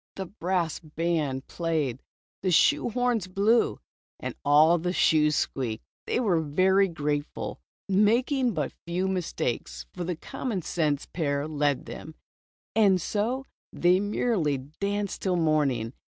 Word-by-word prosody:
The 190 Hz, -, -4 dB
brass 175 Hz, -3 st, -2 dB
band 155 Hz, -4 st, -2 dB
played, 155 Hz, -7 st, -2 dB, 0.4 s
the 185 Hz, -, 0 dB
shoe 265 Hz, -, +4 dB
horns 240 Hz, -4 st, 0 dB
blew, 205 Hz, +5 st, +2 dB, 0.4 s
and -, -, -4 dB
all 155 Hz, +4 st, +5 dB
the 180 Hz, +2 st, -2 dB
shoes 150 Hz, -4 st, +3 dB
squeaked. 120 Hz, -7 st, -2 dB, 0.2 s
They -, -, +1 dB
were 190 Hz, -9 st, +2 dB
very 185 Hz, +6 st, +3 dB
graceful, 150 Hz, -3 st, -3 dB, 0.3 s
making 235 Hz, +5 st, +2 dB
but 150 Hz, -4 st, -2 dB
few 180 Hz, +2 st, 0 dB
mistakes, 110 Hz, -, -3 dB
for -, -, -4 dB
the 175 Hz, 0 st, -2 dB
commonsense 165 Hz, -, -2 dB
pair 145 Hz, -3 st, -2 dB
led 145 Hz, -3 st, 0 dB
them. 155 Hz, -, -9 dB, 0.6 s
And 200 Hz, -4 st, +5 dB
so 230 Hz, +9 st, -1 dB, 0.3 s
they 180 Hz, +2 st, +3 dB
mer 205 Hz, +4 st, -1 dB
rily 150 Hz, -9 st, +1 dB, 0.2 s
danced 200 Hz, 0 st, -2 dB
till 185 Hz, -2 st, +1 dB
morning. 145 Hz, -8 st, +1 dB
175 Hz, 130 wpm, -27 LUFS, 150-200 Hz, 0.6 s, all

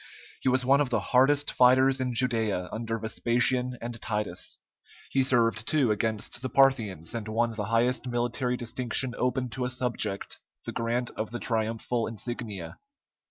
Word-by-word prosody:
He 130 Hz, -, +1 dB
was 125 Hz, 0 st, +1 dB
one 140 Hz, +2 st, +5 dB
of 140 Hz, -, 0 dB
the 115 Hz, -3 st, +1 dB
hardest 135 Hz, +8 st, +3 dB
fighters 130 Hz, +1 st, +5 dB
in 125 Hz, -1 st, -1 dB
Judæa 110 Hz, -7 st, 0 dB
under 115 Hz, 0 st, -3 dB
Vespasian 125 Hz, +3 st, 0 dB
and 115 Hz, -1 st, -6 dB
Titus; 105 Hz, -5 st, -3 dB, 0.5 s
he 135 Hz, -, +3 dB
served, 115 Hz, -3 st, +2 dB
too, 140 Hz, -7 st, +3 dB
against 110 Hz, +2 st, -2 dB
the 130 Hz, -, -3 dB
Parthians, 115 Hz, -, +2 dB
and 115 Hz, -2 st, -4 dB
won 115 Hz, +1 st, 0 dB
the 105 Hz, -2 st, -3 dB
highest 120 Hz, +3 st, +1 dB
military 120 Hz, +1 st, -1 dB
distinction 125 Hz, +1 st, -2 dB
open 125 Hz, 0 st, 0 dB
to 125 Hz, +2 st, -4 dB
a 125 Hz, -, 0 dB
subject, 120 Hz, -5 st, -2 dB, 0.3 s
the -, -, -3 dB
grant 120 Hz, +1 st, -1 dB
of 110 Hz, -, -4 dB
the 120 Hz, -, -4 dB
triumphal 115 Hz, 0 st, -1 dB
insignia. 110 Hz, -5 st, -6 dB
120 Hz, 160 wpm, -28 LUFS, 110-125 Hz, 0.5 s, one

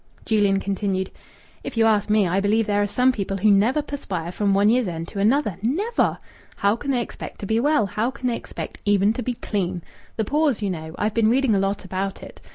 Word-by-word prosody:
Julian 205 Hz, -3 st, +2 dB
continued 195 Hz, -1 st, -2 dB, 0.5 s
"If -, -, -6 dB
you 225 Hz, -, +4 dB
ask 215 Hz, -2 st, +2 dB
me, 210 Hz, -2 st, +3 dB
I 185 Hz, +3 st, +1 dB
believe 215 Hz, +3 st, +2 dB
there 205 Hz, -1 st, +1 dB
are 205 Hz, -, +1 dB
some 250 Hz, +6 st, +3 dB
people 200 Hz, -4 st, -3 dB
who 210 Hz, +2 st, +4 dB
never 230 Hz, +9 st, +3 dB
perspire 180 Hz, -, -4 dB
from 200 Hz, +2 st, 0 dB
one 200 Hz, +1 st, +4 dB
year's 240 Hz, -1 st, +2 dB
end 165 Hz, -1 st, -4 dB
to 200 Hz, -, -6 dB
another. 215 Hz, -, +2 dB
Never! 375 Hz, -, 0 dB, 0.4 s
How 200 Hz, +1 st, +2 dB
can 275 Hz, +4 st, -6 dB
they 250 Hz, -3 st, +1 dB
expect -, -, -9 dB
to -, -, -4 dB
be 220 Hz, +3 st, +1 dB
well? 290 Hz, -3 st, +3 dB
How 215 Hz, +5 st, -1 dB
can 250 Hz, 0 st, -8 dB
they 235 Hz, -, 0 dB
expect -, -, -7 dB
even 205 Hz, +1 st, +3 dB
to 250 Hz, -, -4 dB
be 245 Hz, +1 st, -2 dB
clean? 185 Hz, -6 st, -3 dB, 0.3 s
The 220 Hz, -, 0 dB
pores, 295 Hz, -1 st, +1 dB
you 200 Hz, -3 st, -1 dB
know. 160 Hz, -1 st, -6 dB
I've 210 Hz, 0 st, 0 dB
been 225 Hz, -1 st, +3 dB
reading 255 Hz, -1 st, +3 dB
a 200 Hz, -, +3 dB
lot 195 Hz, +1 st, -1 dB
about 190 Hz, +1 st, -4 dB
it. -, -, -12 dB
210 Hz, 230 wpm, -23 LUFS, 195-235 Hz, 0.5 s, you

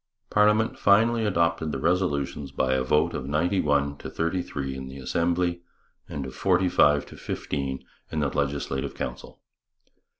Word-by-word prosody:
Parliament 105 Hz, +1 st, +3 dB
finally 115 Hz, +3 st, +4 dB
adopted 85 Hz, -4 st, +1 dB
the 70 Hz, -, -2 dB
resolutions 75 Hz, -4 st, 0 dB
by 65 Hz, -1 st, +1 dB
a 65 Hz, -, +1 dB
vote 75 Hz, +4 st, +2 dB
of 65 Hz, -, -4 dB
ninety 85 Hz, +6 st, +1 dB
one 70 Hz, -1 st, +1 dB
to -, -, -7 dB
thirty 85 Hz, +3 st, -1 dB
three 65 Hz, -5 st, -4 dB
in 65 Hz, 0 st, -6 dB
the 65 Hz, +1 st, -9 dB
Assembly 85 Hz, +5 st, 0 dB, 0.5 s
and 70 Hz, -2 st, -4 dB
of 65 Hz, -, -7 dB
forty 90 Hz, +6 st, +2 dB
five 75 Hz, -4 st, +4 dB
to -, -, -13 dB
fifteen 70 Hz, -2 st, -4 dB, 0.3 s
in 80 Hz, -, -1 dB
the 70 Hz, -, +1 dB
Legislative 70 Hz, -1 st, -2 dB
Council. -, -, -6 dB
75 Hz, 160 wpm, -26 LUFS, 70-90 Hz, 0.5 s, finally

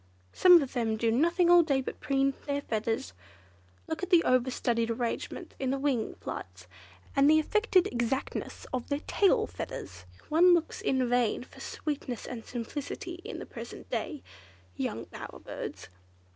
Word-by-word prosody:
Some 355 Hz, -4 st, +7 dB
of 265 Hz, -, -7 dB
them 225 Hz, -3 st, 0 dB
do 225 Hz, +1 st, +2 dB
nothing 340 Hz, +7 st, +3 dB
all 350 Hz, 0 st, +9 dB
day 285 Hz, -5 st, +1 dB
but 260 Hz, -, -5 dB
preen 275 Hz, 0 st, +1 dB
their 285 Hz, 0 st, 0 dB
feathers. 220 Hz, -, -2 dB, 0.7 s
Look 320 Hz, -, -4 dB
at 370 Hz, -, -3 dB
the 350 Hz, -3 st, +6 dB
over 255 Hz, 0 st, +3 dB
studied 230 Hz, -2 st, 0 dB
arrangements 230 Hz, 0 st, -3 dB
of 265 Hz, -, -1 dB
their 270 Hz, -, 0 dB
wing 270 Hz, -5 st, 0 dB
flights, 90 Hz, 0 st, -7 dB, 0.5 s
and 275 Hz, +1 st, +5 dB
the 310 Hz, -, +7 dB
affected 395 Hz, +2 st, +3 dB
exactness 255 Hz, -, -2 dB
of 250 Hz, -2 st, -3 dB
their 285 Hz, 0 st, -1 dB
tail 395 Hz, -2 st, +3 dB
feathers! 95 Hz, -1 st, -7 dB, 0.2 s
One 350 Hz, +3 st, +6 dB
looks 335 Hz, -1 st, -2 dB
in 260 Hz, -2 st, +1 dB
vain 245 Hz, -2 st, +1 dB
for -, -, -16 dB
sweetness 280 Hz, -5 st, -4 dB
and 235 Hz, -3 st, -6 dB
simplicity 295 Hz, -, -5 dB
in -, -, -6 dB
the -, -, -7 dB
present -, -, -9 dB
day 300 Hz, -5 st, -3 dB, 0.5 s
young -, -, -3 dB
bower -, -, -9 dB
birds." -, -, -7 dB
270 Hz, 160 wpm, -29 LUFS, 235-320 Hz, 0.7 s, all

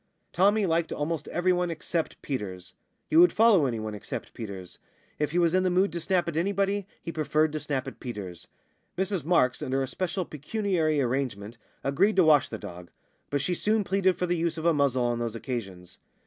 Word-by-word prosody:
Tommy 205 Hz, +3 st, +3 dB
liked 165 Hz, -1 st, 0 dB
almost 150 Hz, 0 st, -3 dB
everyone 180 Hz, 0 st, +1 dB
except 165 Hz, 0 st, -3 dB
Peters. 95 Hz, -9 st, -5 dB, 0.3 s
He 310 Hz, -, -2 dB
would 350 Hz, +1 st, +8 dB
follow 210 Hz, -10 st, +5 dB
anyone 110 Hz, -3 st, -3 dB
except 105 Hz, -, -6 dB
Peters. 95 Hz, -5 st, -8 dB, 0.4 s
If 150 Hz, -, +1 dB
he 165 Hz, -, -2 dB
was 170 Hz, -1 st, +3 dB
in 185 Hz, -, +4 dB
the 185 Hz, -, +2 dB
mood 185 Hz, +1 st, +2 dB
to 170 Hz, -, -3 dB
snap 185 Hz, 0 st, +1 dB
at 170 Hz, -, -3 dB
anybody, 195 Hz, +3 st, 0 dB, 0.2 s
he 165 Hz, -, -4 dB
preferred 155 Hz, 0 st, +1 dB
to 155 Hz, -, -3 dB
snap 140 Hz, -3 st, -3 dB
at 135 Hz, -, -8 dB
Peters. 95 Hz, -8 st, -7 dB, 0.5 s
Mrs 190 Hz, -2 st, -1 dB
Marks 150 Hz, -7 st, +2 dB
(under 135 Hz, +1 st, 0 dB
a -, -, -3 dB
special 185 Hz, +5 st, -2 dB
pecuniary 160 Hz, 0 st, -1 dB
arrangement) 120 Hz, -4 st, -2 dB, 0.2 s
agreed 170 Hz, +10 st, +2 dB
to 190 Hz, -, +5 dB
wash 155 Hz, -3 st, +5 dB
the 110 Hz, -, -5 dB
dog. 90 Hz, -4 st, -9 dB, 0.4 s
But 145 Hz, -1 st, 0 dB
she 180 Hz, +6 st, 0 dB
soon 210 Hz, +4 st, +1 dB
pleaded 190 Hz, -1 st, +1 dB
for 180 Hz, -, 0 dB
the 175 Hz, 0 st, 0 dB
use 165 Hz, -1 st, -1 dB
of 160 Hz, -, -5 dB
a 170 Hz, -, +5 dB
muzzle 140 Hz, -4 st, +2 dB
on 120 Hz, -1 st, 0 dB
those 115 Hz, -1 st, -3 dB
occasions. 100 Hz, -8 st, -6 dB
155 Hz, 195 wpm, -27 LUFS, 125-180 Hz, 0.5 s, would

